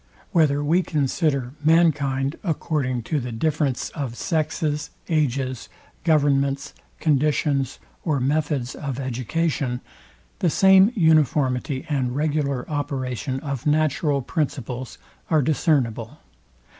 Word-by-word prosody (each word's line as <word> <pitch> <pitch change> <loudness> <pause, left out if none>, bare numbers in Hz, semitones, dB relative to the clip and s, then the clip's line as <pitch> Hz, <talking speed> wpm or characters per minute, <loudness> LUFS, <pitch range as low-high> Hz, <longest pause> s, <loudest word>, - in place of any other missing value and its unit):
Whether 145 -3 +3
we 165 +5 +3
consider 140 -4 0
mankind 145 -4 +3
according 145 - -1
to 150 +6 -1
the 125 -2 -5
difference 140 +2 -1
of 135 -7 -4
sexes, 155 -2 -1 0.2
ages, 135 -5 -1 0.3
governments, 140 -3 +2 0.3
conditions, 145 -2 +1 0.3
or 150 -5 0
methods 140 -1 0
of 140 -3 -5
education; 130 +1 -1 0.6
the 175 - +2
same 190 +5 +6
uniformity 145 - +2
and 130 -5 -1
regular 145 -3 -1
operation 130 -4 -3
of 140 -2 -4
natural 150 -2 +1
principles 130 -4 -3 0.3
are 155 -3 +3
discernible. 135 -4 0
145 Hz, 100 wpm, -23 LUFS, 130-155 Hz, 0.6 s, same